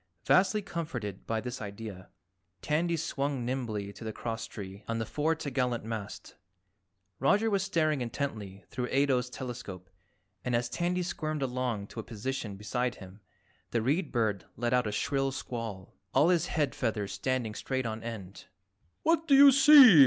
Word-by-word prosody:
Vastly 200 +3 +4
comforted 145 - -5
by 115 -1 0
this 125 +1 -5
idea, 100 -2 -7 0.5
Tandy 165 +3 +1
swung 140 -4 -2
nimbly 110 -6 -3
to - - -10
the 110 - -3
crosstree 110 -4 -6
on 115 - -1
the 115 - -1
fore 155 +7 0
t'gallant 130 -6 -1
mast. 110 -2 -6 0.9
Roger 205 - +3
was 200 -1 +2
staring 155 -7 +1
intently 110 -6 -4
through 125 -1 -2
Ato's 130 -3 +2
telescope 110 -8 -7 0.5
and 125 -1 0
as 120 0 0
Tandy 180 +1 0
squirmed 155 -4 -2
along 125 -5 -1
to 115 - -9
a - - -3
position 115 -1 -4
beside 125 +4 -1
him, 95 +1 -12 0.5
the 115 -2 0
Read 150 +7 +1
Bird 110 -6 0
let 120 +1 0
out 125 -3 +3
a - - -1
shrill 135 +4 0
squall, 115 -7 -5 0.2
all 160 - +6
his 175 -2 +3
head 145 -4 0
feathers 110 -5 -1
standing 115 +2 -1
straight 130 +3 -2
on 110 0 -3
end. 105 -5 -7 0.6
"What 330 0 +2
do 280 - +6
you 280 0 +10
see? 270 - +9
125 Hz, 160 wpm, -30 LUFS, 110-150 Hz, 0.9 s, you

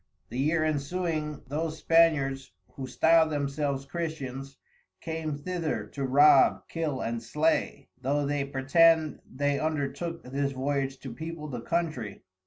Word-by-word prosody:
The 125 - -5
year 155 +3 +2
ensuing 155 0 -2
those 155 +3 -3
Spaniards 140 - +2 0.2
(who 135 -1 -7
style 160 +5 +4
themselves 140 -1 -2
Christians) 135 -4 -5 0.4
came 160 -2 -4
thither 155 -8 -3
to 140 - -3
rob, 135 +1 +5
kill 155 -5 -2
and 115 0 -2
slay, 145 +2 0
though 145 +3 0
they 145 0 0
pretend 155 +4 +3
they 145 +1 0
undertook 155 +2 -2
this 140 +2 -2
Voyage 135 0 -1
to 130 -4 -7
people 160 +3 -6
the 125 -4 -5
Countrey. 155 - -3
145 Hz, 130 wpm, -28 LUFS, 135-160 Hz, 0.4 s, rob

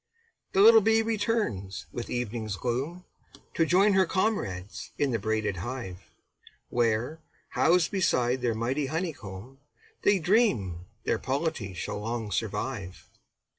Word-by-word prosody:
The 190 - +4
little 225 +1 +9
bee 225 +2 +3
returns 205 - -1
with 120 - -5
evening's 115 -3 -3
gloom, 135 - -3 0.5
To 165 - +2
join 195 +4 +5
her 190 -2 +4
comrades 110 - -2
in 140 -2 +1
the 115 - 0
braided 110 -2 -1
hive, 95 -2 -6 0.6
Where, 120 +6 0 0.3
housed 170 0 +3
beside 130 -10 +1
their 120 -2 0
mighty 130 +6 -1
honeycomb, 135 - -5 0.4
They 205 -1 +4
dream 160 - +1 0.2
their - - 0
polity 135 - -2
shall 90 - -4
long 110 0 -3
survive. 105 - -3
125 Hz, 125 wpm, -28 LUFS, -, 0.6 s, little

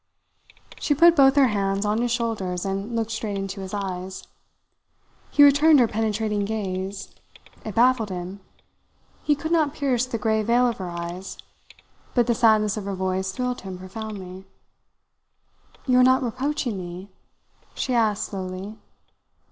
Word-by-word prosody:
She 290 - +1
put 335 +3 +6
both 270 -2 +6
her 275 -3 +5
hands 200 -1 -1
on 210 +2 +1
his 245 - 0
shoulders 220 -7 -2
and 195 +4 -3
looked 225 -1 -1
straight 220 -2 -3
into 195 0 -5
his 190 0 -7
eyes. 190 -2 -5 1.1
He 290 - +5
returned 290 +1 +6
her 240 - +5
penetrating 215 -1 -1
gaze. 195 -2 -4 0.5
It 215 - -6
baffled 240 -2 +3
him. 185 +1 -6 0.8
He 295 - +2
could 315 +3 -5
not 310 -3 +2
pierce 255 -3 0
the 240 - -3
grey 220 0 +1
veil 235 +3 +3
of 235 - -2
her 185 -2 -4
eyes; 170 +2 -6 0.8
but 240 -2 +4
the 240 - +2
sadness 215 -2 +3
of 205 - -5
her 200 -1 -3
voice 190 0 -2
thrilled 250 +3 -3
him 190 -1 -7
profoundly. 190 -1 -8 1.4
"You 255 -2 +4
are - - +7
not 260 +1 +4
reproaching 250 -2 -2
me?" 180 +2 -8 0.6
she 260 - -2
asked 215 -3 +2
slowly. 190 +2 -6
215 Hz, 150 wpm, -24 LUFS, 190-245 Hz, 1.4 s, are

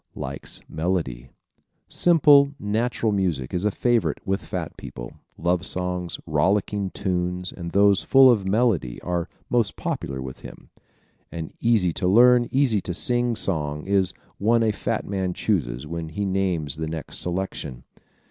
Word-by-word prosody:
Likes 70 +1 -6
Melody 80 -8 -2 0.3
¶ - - -40 0.3
Simple, 145 -4 +5
natural 110 +2 0
music 90 -11 -1
is 90 +1 0
a - - +4
favorite 120 +3 0
with 95 -1 -1
fat - - -5
people. - - -9 0.2
Love 85 +2 0
songs, 90 -1 -3
rollicking 95 +5 +1
tunes 90 -1 -2
and 85 -2 -7
those 100 +1 +4
full 135 0 +6
of 100 -5 0
melody 100 - +1
are 90 0 -2 0.2
most 120 -4 +1
popular 65 -1 -4
with 65 -1 -7
them. - - -13 0.6
An 80 -2 -6
easy 110 -8 +2
to 90 - -1
learn, 120 +4 +6
easy 130 -7 +2
to 90 - -4
sing 120 +1 +1
song 75 -7 -1
is 95 -2 +2
the - - -31 0.2
one 115 +3 +3
a 110 - +2
fat 110 +1 -3
man 95 -2 -2
chooses 65 - -1
when 80 +1 -5
he 100 +6 -3
names 90 -7 -1
the 80 0 -3
next 80 -1 -5
selection. 90 -8 -3
95 Hz, 155 wpm, -24 LUFS, 80-110 Hz, 0.6 s, full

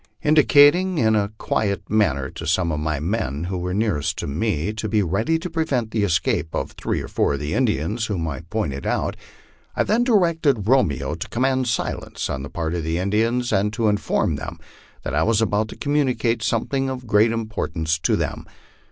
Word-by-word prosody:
In 150 - +3
dicating 155 +5 +5
in 110 -5 +3
a 100 -1 +1
quiet 100 -3 -1
manner 75 -11 +1
to - - -7
some 85 +1 +1
of 75 - -2
my 75 -1 -1
men 80 - -2
who 90 +1 -3
were 90 +1 -3
nearest 100 -7 0
to - - -3
me 85 +4 -1
to 110 0 -4
be 105 -1 +2
ready 105 - +1
to 165 - -5
prevent 150 -9 -1
the 110 - 0
escape 85 -3 0
of - - -2
three - - -3
or - - -7
four - - +1
of - - -5
the 75 +1 -3
Indians 110 - 0
whom 90 -6 -2
I 75 -2 -4
pointed 80 -6 -3
out, - - -1 0.6
I - - +2
then 230 +3 +2
directed 165 - +2
Romeo 75 - +2
to 80 - -6
command 130 +1 +1
silence 115 - -2
on 65 - -3
the 70 - -7
part 80 -1 -3
of 85 -2 -2
the 80 +1 -1
Indians, 115 +6 0
and 100 +2 +2
to 110 0 +1
inform 105 -1 0
them - - -7 0.5
that - - -4
I 75 - +2
was 110 +4 +2
about 110 -1 +1
to - - -9
communicate 125 -6 0
something 135 +4 0
of 130 -1 -5
great 110 +1 +4
import 110 -4 -3
ance 80 0 0
to - - +1
them. - - -3
105 Hz, 205 wpm, -22 LUFS, 80-125 Hz, 0.6 s, dicating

